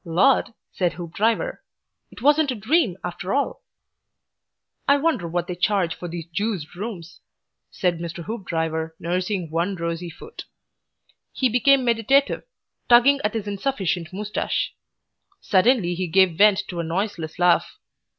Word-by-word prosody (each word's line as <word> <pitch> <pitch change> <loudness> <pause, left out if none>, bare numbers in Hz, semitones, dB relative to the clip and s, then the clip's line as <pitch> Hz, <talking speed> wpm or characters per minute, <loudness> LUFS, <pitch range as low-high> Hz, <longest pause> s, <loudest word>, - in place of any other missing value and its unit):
"Lord!" 190 +11 +3 0.2
said 180 -2 0
Mr. - - -15
Hoopdriver. 190 +6 -1 0.5
"It - - -13
wasn't 295 +1 +4
a 255 - -1
dream, 225 - +1
after 180 +4 -3
all." 280 - -1 1.3
"I 280 - +5
wonder 280 - 0
what 175 +1 -2
they 180 - -4
charge 180 -1 +1
for 175 - -7
these 170 -1 -6
Juiced 180 -2 -3
rooms!" 180 -3 -7 0.5
said 175 -3 -1
Mr. 170 0 -6
Hoopdriver, 160 -7 -3
nursing 180 0 -2
one 170 +4 0
rosy 170 0 -4
foot. 445 - -11 0.9
He 260 - +1
became 255 +3 +4
meditative, 240 +4 +2 0.5
tugging 260 +4 +6
at 210 +1 -1
his 220 -2 -2
insufficient 195 -6 -2
moustache. 210 +2 -2 0.7
Suddenly 195 -2 +3
he 180 +1 -2
gave 185 0 +4
vent 205 +2 +5
to 175 - -5
a - - -1
noiseless 170 -1 -3
laugh. 175 -1 +2
190 Hz, 140 wpm, -23 LUFS, 170-230 Hz, 1.3 s, tugging